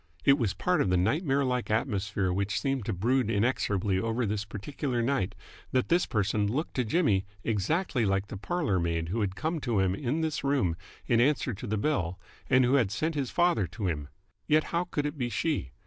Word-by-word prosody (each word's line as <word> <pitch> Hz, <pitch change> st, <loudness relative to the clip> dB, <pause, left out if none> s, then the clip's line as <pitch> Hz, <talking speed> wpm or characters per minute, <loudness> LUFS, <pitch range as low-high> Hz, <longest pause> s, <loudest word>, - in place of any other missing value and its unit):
It 140 Hz, +1 st, +6 dB
was 105 Hz, -5 st, 0 dB
part 180 Hz, -, +1 dB
of 95 Hz, -, +1 dB
the 90 Hz, -, +3 dB
nightmare 135 Hz, -, +1 dB
like 125 Hz, -1 st, -1 dB
atmosphere 100 Hz, -4 st, 0 dB
which 100 Hz, +4 st, 0 dB
seemed 135 Hz, -5 st, -1 dB
to 115 Hz, -, -1 dB
brood 115 Hz, +5 st, +1 dB
inexorably 100 Hz, -4 st, +1 dB
over 115 Hz, +4 st, 0 dB
this 105 Hz, 0 st, -2 dB
particular 120 Hz, +4 st, -3 dB
night 115 Hz, -7 st, 0 dB, 0.4 s
that 130 Hz, -1 st, +1 dB
this 175 Hz, +1 st, +3 dB
person 105 Hz, -1 st, 0 dB
looked 150 Hz, +7 st, -2 dB
to 125 Hz, -, +3 dB
Jimmy 110 Hz, -, +1 dB, 0.2 s
exactly 120 Hz, -, 0 dB
like 95 Hz, -1 st, +1 dB
the -, -, -5 dB
parlour 140 Hz, -, -1 dB
maid 85 Hz, -1 st, -1 dB
who 110 Hz, +5 st, -1 dB
had 95 Hz, -2 st, -1 dB
come 160 Hz, +5 st, -2 dB
to 120 Hz, -6 st, -1 dB
him 95 Hz, -1 st, +2 dB
in 140 Hz, +8 st, -1 dB
this 160 Hz, -3 st, -2 dB
room 135 Hz, -12 st, +1 dB, 0.3 s
in 120 Hz, -1 st, +3 dB
answer 135 Hz, -1 st, +2 dB
to 100 Hz, -, -7 dB
the 110 Hz, +1 st, -1 dB
bell 95 Hz, -, -1 dB, 0.3 s
and 130 Hz, -1 st, +5 dB
who 125 Hz, -, +2 dB
had 125 Hz, -8 st, +3 dB
sent 160 Hz, +11 st, -1 dB
his 140 Hz, -4 st, -2 dB
father 175 Hz, -, +2 dB
to 100 Hz, +5 st, -5 dB
him. 75 Hz, -4 st, -2 dB, 0.4 s
Yet 155 Hz, 0 st, +4 dB
how 170 Hz, +1 st, +1 dB
could 150 Hz, -4 st, -2 dB
it 150 Hz, 0 st, -4 dB
be 120 Hz, -1 st, 0 dB
she? 120 Hz, -, -1 dB
115 Hz, 210 wpm, -29 LUFS, 100-140 Hz, 0.4 s, It